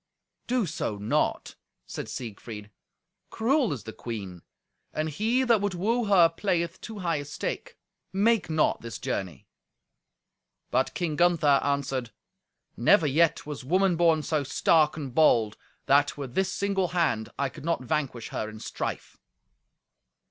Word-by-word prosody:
"Do 245 -3 +1
so 145 - -3
not," 105 +1 -1 0.3
said - - -6
Siegfried. 105 -2 -7 0.6
"Cruel 255 +2 +1
is 135 -6 -4
the 110 - -8
queen, 100 -7 -6 0.5
and 155 +1 0
he 225 - +1
that 235 -5 +3
would 205 -2 -1
woo 230 +6 0
her 190 -5 +6
playeth 170 0 -2
too 220 -2 -8
high 165 -2 +1
a 145 - -5
stake. 145 - -5 0.3
Make 205 0 +2
not 155 -1 +1
this 115 -1 -6
journey." 95 - -4 1.3
But 130 +2 +1
King 165 -4 -1
Gunther 170 -5 +4
answered, 135 -4 -1 0.7
"Never 160 - +4
yet 155 +3 +2
was 145 -3 -6
woman 185 +5 +2
born 165 -2 +3
so 155 -2 0
stark 155 +3 +3
and 140 -5 -5
bold, 115 -8 +4 0.3
that, 145 +2 +3
with 135 -4 -6
this 190 +3 +1
single 195 -2 0
hand, 165 -11 0
I 140 -1 0
could 130 - -12
not 165 -5 -1
vanquish 130 -4 -2
her 110 - -3
in 110 0 -10
strife." - - -5
155 Hz, 145 wpm, -27 LUFS, 130-185 Hz, 1.3 s, her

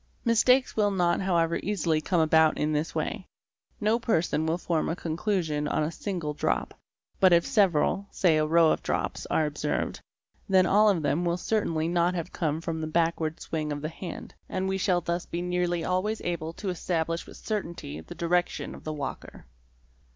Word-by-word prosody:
Mistakes 250 +3 +4
will 210 -2 +3
not 175 -3 +1
however 170 -3 +1
easily 170 -6 0
come 175 +1 +1
about 160 0 +4
in 150 +1 0
this 150 +2 -2
way. - - -3 0.5
No 220 +1 +2
person 165 -8 0
will 165 +2 +1
form 170 -2 -1
a 165 - -1
conclusion 165 -3 -1
on 155 - 0
a 155 - -1
single 170 -5 -4
drop, - - -1 0.5
but 185 -1 +6
if 170 0 +5
several, 195 0 +2
say 165 -4 +2
a 155 - +2
row 165 0 +5
of - - 0
drops, - - -2
are 155 - +2
observed, 150 0 -2 0.5
then 190 -1 +5
all 210 +2 +5
of 175 -6 +1
them 145 +4 +1
will 170 0 0
certainly 170 -6 0
not 175 +1 +1
have 170 +1 -4
come 160 -1 -1
from 165 -1 -3
the 155 - -2
backward 165 -1 0
swing 155 -2 -3
of 145 0 -4
the 155 - -2
hand, 170 +2 -8 0.2
and 190 0 -2
we 190 0 -1
shall 185 -2 +2
thus 170 +1 -3
be 170 - -4
nearly 175 -1 -1
always 185 +5 0
able 165 -2 -3
to 195 +2 -5
establish 165 -2 -2
with - - -12
certainty 170 - -4
the 80 - -10
direction 175 +1 0
of - - -11
the 155 - -4
walker. 145 -3 -6
170 Hz, 190 wpm, -27 LUFS, 155-185 Hz, 0.5 s, but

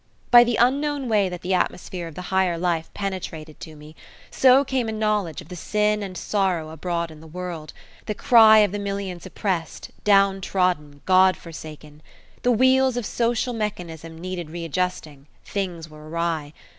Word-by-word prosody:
By 240 -1 +10
the 240 -1 0
unknown 275 +3 +1
way 210 -4 +2
that 180 -1 -7
the 185 +1 -1
atmosphere 180 -1 -2
of 165 - -11
the 180 - -6
higher 185 -3 +2
life 170 -2 -1
penetrated 170 -6 -5
to 155 - -10
me, 150 +1 -14 0.4
so 265 +1 +5
came 255 -4 -1
a - - -2
knowledge 210 -6 -1
of 160 - -15
the 180 - -7
sin 210 +4 0
and 190 -2 -6
sorrow 185 -6 -1
abroad 170 +1 -3
in 155 -1 -13
the 160 - -13
world 170 -2 -6 0.4
the 215 - -2
cry 220 -2 +7
of 200 - -4
the 205 - -3
millions 195 -3 -4
oppressed, 185 -6 -3
downtrodden, 185 -7 +2
God 185 0 +5
forsaken! 155 -2 -11 0.4
The 245 - +2
wheels 260 +1 +3
of 245 - -2
social 240 +2 0
mechanism 165 -7 -5
needed 180 -2 -5
readjusting 165 -3 -4 0.2
things 180 -5 -4
were 155 0 -13
awry. 165 -3 -2
185 Hz, 165 wpm, -23 LUFS, 165-210 Hz, 0.4 s, By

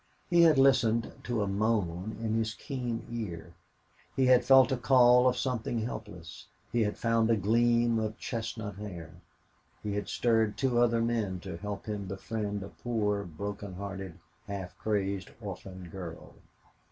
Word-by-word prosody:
He 175 -1 +6
had 160 -4 +6
listened 120 -4 +4
to 120 -4 0
a - - -2
moan 100 -2 -1
in 110 -1 -1
his 110 0 0
keen 125 -5 -4
ear; 85 -8 -5 0.6
he 135 - +3
had 125 -1 +6
felt 135 -2 +6
a 130 - +1
call 125 +1 +6
of 125 0 +2
something 120 -3 -1
helpless; 105 -7 -7 0.2
he 120 - +1
had 105 -1 0
found 115 -1 +2
a 115 - +5
gleam 115 +3 +3
of 110 0 -3
chestnut 110 -3 -4
hair; 90 -6 -7 0.7
he 105 -1 -2
had 105 0 -3
stirred 110 -3 +1
two 125 0 +1
other 115 -1 +3
men 110 -6 -1
to 95 -2 -6
help 100 +3 -6
him 105 -2 -4
befriend 100 +1 -4
a 100 - -8
poor, 105 -4 -1
broken 100 +3 -6
hearted, 95 -2 -6 0.3
half 95 -3 -6
crazed 100 -3 -1
orphan 95 -3 -8
girl. 85 -3 -8
110 Hz, 155 wpm, -30 LUFS, 100-120 Hz, 0.7 s, He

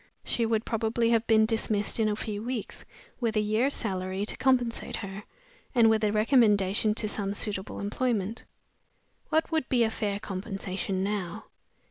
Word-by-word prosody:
She 230 -1 0
would 225 0 0
probably 230 +1 +1
have 230 -1 +2
been 220 -1 +5
dismissed 220 -1 0
in 220 -1 +3
a 210 - 0
few 210 -1 -4
weeks, 240 -2 -5 0.3
with 230 -3 0
a - - +3
year's 215 +6 +1
salary 190 -2 -2
to - - -3
compensate 245 -3 +1
her, 195 -1 -6 0.5
and 225 -2 +6
with 220 0 +2
a 210 - +3
recommendation 215 -3 +3
to 215 - -1
some 200 -1 -2
suitable 200 -2 -3
employment. 215 0 -1 0.9
What 315 +1 +1
would 315 -4 0
be 245 -2 +3
a 220 - +1
fair 205 -3 -2
compensation 195 -1 -3
now? 200 -1 -3
215 Hz, 160 wpm, -28 LUFS, 200-230 Hz, 0.9 s, and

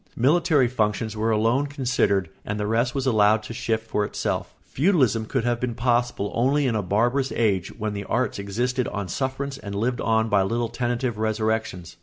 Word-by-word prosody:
Military 150 +1 +3
functions 110 -2 -1
were 110 +1 0
alone 115 +6 +2
considered 125 - +1 0.2
and 105 +1 -4
the 105 - -1
rest 115 +4 0
was 135 -1 -1
allowed 110 -3 +3
to - - -7
shift 115 -1 -2
for 105 - 0
itself. 105 - -3
Feudalism 130 - +1
could 130 -1 -1
have 120 -1 0
been 120 -2 -2
possible 120 -3 0
only 140 +5 +2
in 125 - +1
a 105 - +1
barbarous 120 +8 +1
age 100 -6 +1
when 110 -1 -3
the 100 0 -5
arts 125 -3 -1
existed 120 +6 -1
on 100 -2 -4
sufferance 135 +4 -3
and 100 -1 -6
lived 120 +4 -1
on 110 0 +2
by 100 -3 +3
little 115 +4 -1
tentative 120 -1 -2
resurrections. 110 -5 -2
115 Hz, 185 wpm, -24 LUFS, 105-125 Hz, 0.2 s, Military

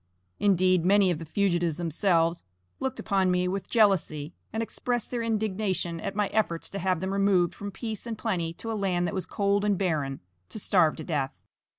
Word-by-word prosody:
Indeed, 185 -3 +3
many 195 0 +4
of 160 - -2
the 165 - -7
fugitives 175 -2 +1
themselves 170 0 +1 0.4
looked 265 -1 -3
upon 195 -3 +1
me 180 0 +2
with 190 +1 -3
jealousy, 175 -8 +2 0.2
and 220 +1 -1
expressed 240 +1 -2
their 240 -2 -1
indignation 210 -6 -1
at 195 - -4
my 210 0 +2
efforts 185 -6 -1
to 200 - -4
have 185 -2 0
them 190 +1 -2
removed 195 -3 +3
from 205 - -6
peace 220 +2 -6
and 225 -2 -4
plenty 180 -8 -1
to 225 +6 -6
a - - -1
land 190 -4 0
that 175 - -2
was 190 -2 -3
cold 200 0 +1
and 205 -2 +2
barren, 150 -8 -1 0.3
to - - -7
starve 180 -6 +3
to 160 - -7
death. 145 -5 -2
190 Hz, 195 wpm, -27 LUFS, 170-205 Hz, 0.4 s, many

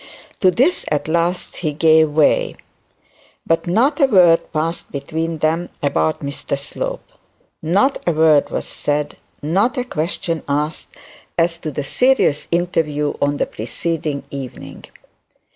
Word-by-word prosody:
To 185 - +5
this 260 - +2
at 150 -1 -1
last 170 +2 -1
he 155 -4 -2
gave 160 0 +4
way; 150 0 +2 0.9
but 165 +1 0
not 235 - +2
a 275 - +6
word 180 -8 +4
passed 165 +2 -3
between 160 +3 -3
them 160 +3 0
about 80 - +1
Mr 140 0 -3
Slope - - -4 0.5
not 195 - +2
a - - +4
word 155 -2 +4
was - - -3
said, 145 0 -2 0.3
not 200 - +1
a 250 - 0
question 165 - -3
asked 150 +2 -2 0.5
as 170 0 +1
to 155 - -4
the 145 0 -4
serious 250 - +2
interview 160 -4 0
on 145 0 +1
the - - +1
preceding 150 +6 -3
evening. 135 -3 -8
160 Hz, 135 wpm, -19 LUFS, 145-175 Hz, 0.9 s, a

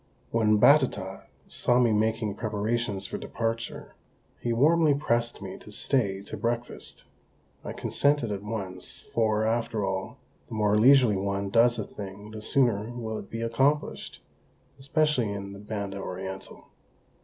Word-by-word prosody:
When 110 -2 +3
Batata 105 -9 +3 0.2
saw 120 - +1
me 120 -3 +4
making 110 0 +1
preparations 105 -1 -2
for - - -5
departure, 115 0 -4 0.5
he 120 - -2
warmly 150 +5 +4
pressed 120 -5 0
me 95 -1 -7
to 105 - -13
stay 100 -4 0
to - - -7
breakfast. 120 0 -3 0.6
I - - -5
consented 145 -6 +1
at 100 -1 -3
once, 95 -4 -6
for, 110 -1 +2
after 115 -2 0
all, 95 0 -3 0.3
the 115 - -7
more 105 -1 +2
leisurely 120 -2 +6
one 100 0 -2
does 120 +2 +5
a 110 - -2
thing 100 +1 -9
the 110 0 -7
sooner 110 -3 +2
will 115 -2 -4
it - - -11
be 115 - -5
accomplished 135 +6 0 0.6
especially 140 -5 +1
in 100 -1 -5
the 100 - -10
Banda 100 -1 -4
Orientál. 95 0 -6
110 Hz, 145 wpm, -27 LUFS, 100-120 Hz, 0.6 s, leisurely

